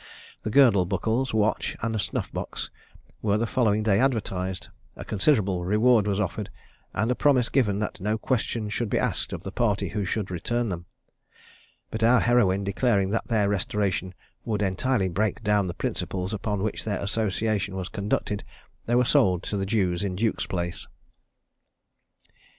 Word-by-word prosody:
The - - -3
girdle 110 -7 +5
buckles, 110 +7 0
watch, 110 0 +1
and 110 -2 0
snuff - - -3
box, - - -5 0.5
were 105 -1 +2
the 115 - 0
following 110 -3 +1
day 105 -2 +3
advertised, 95 -8 -1 0.3
a - - -8
considerable 100 -5 +1
reward 105 +3 +4
was 100 0 0
offered, 105 +1 -2 0.4
and 110 +3 0
a - - +4
promise 130 -3 +3
given 105 -7 +2
that 105 - -3
no 105 +3 0
questions 110 -2 -1
should 120 -1 -1
be - - +1
asked - - -1
of - - -5
the - - -5
party 105 -4 0
who 105 -1 -2
should 100 0 -2
return 120 +7 -1
them; 85 -2 -5 1.0
but 110 - -4
our 120 +2 +6
heroine 100 -5 +3
declaring 100 -1 +1
that 115 - -1
their 110 -3 +2
restoration 95 -2 -1 0.3
would 105 -2 -1
entirely 100 +2 +1
break 105 +5 -1
down 105 -2 +2
the 85 - -5
principles 95 +2 -3
upon 105 -1 -2
which 110 - -2
their 105 -3 -1
association 105 -1 -1
was 95 -1 -3
conducted, 100 0 -2 0.4
they 120 - +2
were 125 +1 +4
sold 90 -5 +3
to - - -3
the 95 -1 -1
Jews 95 -4 +1
in 95 -2 -2
Duke's 110 +3 0
place. 85 -2 -3
105 Hz, 165 wpm, -26 LUFS, 95-115 Hz, 1.0 s, our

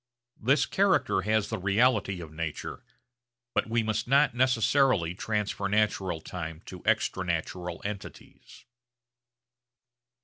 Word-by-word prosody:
This 135 +6 +3
character 190 - +2
has 110 +1 +1
the - - -3
reality 100 -1 +2
of 80 -2 -10
nature, 80 -2 -5 0.7
but - - 0
we 115 0 +1
must 110 0 -1
not 140 +1 +4
necessarily 125 - +3
transfer 105 0 -2
natural 95 -5 0
time 80 -1 -6
to 90 -2 -9
extra 95 - +1
natural 90 0 -3
entities. 100 -1 -9
100 Hz, 110 wpm, -28 LUFS, 90-120 Hz, 0.7 s, not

